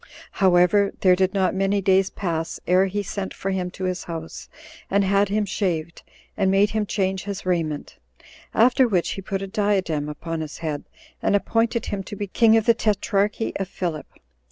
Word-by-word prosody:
However, 190 +1 +3
there 185 -1 +5
did 190 +1 0
not 190 -1 +2
many 195 +1 +1
days 190 0 +3
pass 165 -4 -3
ere 185 +2 +4
he 205 +2 -2
sent 195 0 -5
for 195 - -3
him 185 -1 -2
to 190 - -8
his 185 0 -2
house, 165 -1 -7 0.4
and 200 +1 +3
had 200 +1 +2
him 210 +1 +1
shaved, 170 -5 -2 0.3
and 195 -2 +1
made 195 +2 +3
him 215 -1 -1
change 190 -2 -1
his 200 -1 -5
raiment; 165 -5 -2 0.5
after 250 +3 +4
which 185 -6 +1
he 195 - -5
put 195 0 -3
a - - -4
diadem 190 -7 0
upon 165 +2 -5
his 155 -1 -6
head, 155 -3 -4 0.4
and - - +2
appointed 225 +3 +1
him 200 - -3
to 205 +2 -8
be 205 - -3
king 225 +3 +4
of 220 - +1
the 230 - +6
tetrarchy 210 -1 0
of 195 - -3
Philip. 170 -5 -4
195 Hz, 185 wpm, -23 LUFS, 180-205 Hz, 0.5 s, the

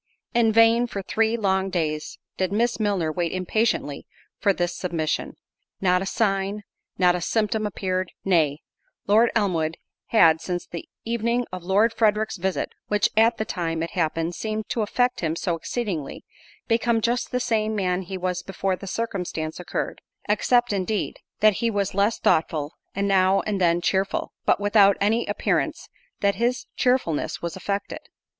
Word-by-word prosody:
In 235 -2 +4
vain, 230 +2 +5
for 200 -4 -5
three 225 +3 +1
long 190 -2 +1
days, 155 -4 -2 0.2
did 185 0 -1
Miss 235 +3 +1
Milner 195 -7 0
wait 170 0 -1
impatiently 185 -5 -1 0.3
for 200 - +3
this 175 -2 -1
submission; 165 -4 -2 0.5
not 180 -1 +2
a 195 - -3
sign, 200 -1 0 0.3
not 180 -1 +4
a 180 - -2
symptom 215 +2 0
appeared—nay, 185 -6 0 0.4
Lord 220 +4 +5
Elmwood 165 -7 0 0.3
had, 165 -8 +5
since 175 -1 -3
the 170 - -8 0.2
evening 235 +1 0
of 185 0 -5
Lord 205 +5 +3
Frederick's 215 -1 +1
visit, 190 +1 -1 0.2
(which, 210 -1 +2
at 225 +1 +4
the 220 - -2
time 165 -3 -2
it 165 - -4
happened, 165 0 -1
seemed 215 +3 -3
to 230 - -1
affect 245 +4 +1
him 160 -2 -1
so 170 0 -1
exceedingly) 170 - -4 0.4
become 230 0 +2
just 240 +2 0
the 250 - -1
same 220 -3 0
man 185 -2 0
he 190 +1 -6
was 180 -1 -2
before 190 0 -2
the 195 - -10
circumstance 180 -7 -3
occurred; 180 - -4 0.3
except, 240 +2 +2
indeed, 200 +2 -1 0.2
that 215 -2 +5
he 235 - +1
was 200 -3 -1
less 200 +3 +2
thoughtful, 155 -1 +1 0.2
and 200 +1 0
now 190 0 +4
and 205 -3 -2
then 170 0 +3
cheerful; 190 +2 0
but - - +3
without 205 -1 +5
any 220 +4 +1
appearance - - -1 0.3
that 200 0 +3
his 245 +1 +1
cheerfulness 250 - 0
was 170 +1 -3
affected. 200 +1 -3
195 Hz, 160 wpm, -24 LUFS, 180-220 Hz, 0.5 s, vain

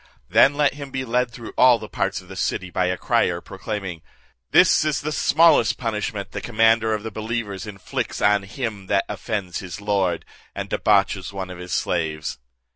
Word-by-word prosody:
Then 140 - +5
let 145 -2 +2
him 140 -1 -8
be 130 0 -3
led 125 +1 +1
through 120 -1 -10
all 125 -1 +7
parts - - -2
of - - -18
the - - -10
city 95 -1 -2
by 90 +1 +1
a 90 0 -1
crier, 85 0 +1
proclaiming, 95 -2 -6 0.5
'This - - +5
is 155 -2 0
the 155 - -3
smallest 160 -5 +4
punishment 105 -3 -3
the - - -5
commander 115 -1 +3
of 105 - -6
the 110 - -5
believers 110 -1 -4
inflicts 100 -3 -4
on 105 0 +4
him 105 -1 -5
that 100 -1 +2
offends 95 -6 -3
his 90 -1 -7
lord, 100 -5 0 0.3
and - - -5
debauches - - +2
one 95 -2 -5
of 90 - -9
his 90 0 -8
slaves.' 80 -6 -2
105 Hz, 180 wpm, -23 LUFS, 95-120 Hz, 0.5 s, all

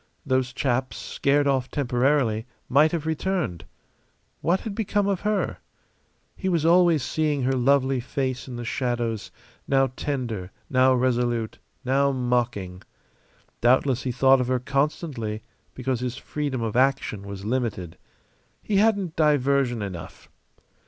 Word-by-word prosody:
Those 130 -2 +1
chaps, 130 0 -1
scared 145 +1 +1
off 135 -2 +1
temporarily, 125 -3 +1 0.2
might 150 +4 +4
have 165 -3 -2
returned. 160 - -2 0.8
What 175 +3 +1
had 220 - -5
become 205 -1 0
of 195 -3 0
her? 210 -1 -1 0.8
He 190 - -2
was 165 -3 +1
always 170 -3 +5
seeing 150 -2 0
her 130 - +2
lovely 135 +1 +2
face 130 +1 -3
in 125 - -7
the 120 0 -5
shadows, 120 -3 -2 0.4
now 135 -2 +3
tender, 120 -10 -3 0.2
now 130 0 +5
resolute, 120 -2 0 0.3
now 140 +2 +3
mocking. 120 -8 -1 0.8
Doubtless 130 +1 +3
he 130 - -2
thought 135 +1 +4
of 125 - -1
her 130 0 +2
constantly 135 -5 -2 0.3
because 130 -1 -2
his 125 0 -3
freedom 140 -6 -3
of 110 -1 -3
action 130 -5 +1
was 100 0 -8
limited. 110 -8 -2 0.7
He 205 - 0
hadn't 200 -5 +2
diversion 140 -6 +2
enough. 90 -5 -8
130 Hz, 130 wpm, -25 LUFS, 120-145 Hz, 0.8 s, always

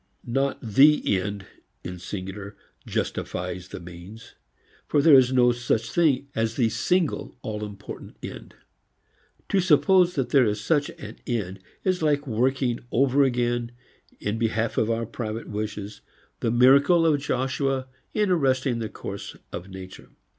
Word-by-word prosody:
Not 135 +3 0
the 130 -2 +4
end 100 +1 -5 0.4
in 90 - -5
the 90 - -10
singular 100 +2 -7 0.3
justifies 90 +1 -3
the - - -8
means; 90 +5 -11 0.5
for 145 - +2
there 150 +1 +6
is 130 -2 +7
no 125 -1 +5
such 120 -2 -1
thing 145 -5 +2
as 115 0 -1
the 120 -4 +2
single 165 +9 0
all 105 -1 -4
important 105 -2 -9
end. - - -8 0.9
To 195 - +3
suppose 180 +1 +4
that 135 -4 -1
there 135 -5 +5
is 105 0 -1
such 145 +7 +1
an 110 +1 -10
end 100 -6 -2 0.2
is 185 -2 +1
like 145 -2 +1
working 125 0 0
over 135 +2 +3
again, 120 -2 0 0.5
in 105 +2 -2
behalf 115 0 0
of 110 - +1
our 115 0 0
private 115 0 -5
wishes, 105 0 -5 0.4
the 115 - 0
miracle 140 +8 +5
of 150 -3 +3
Joshua 135 0 -1 0.3
in 210 -3 +1
arresting 130 -6 +1
the 110 -2 -3
course - - -7 0.2
of 90 +2 -6
nature. 95 -1 -10
120 Hz, 145 wpm, -25 LUFS, 105-140 Hz, 0.9 s, is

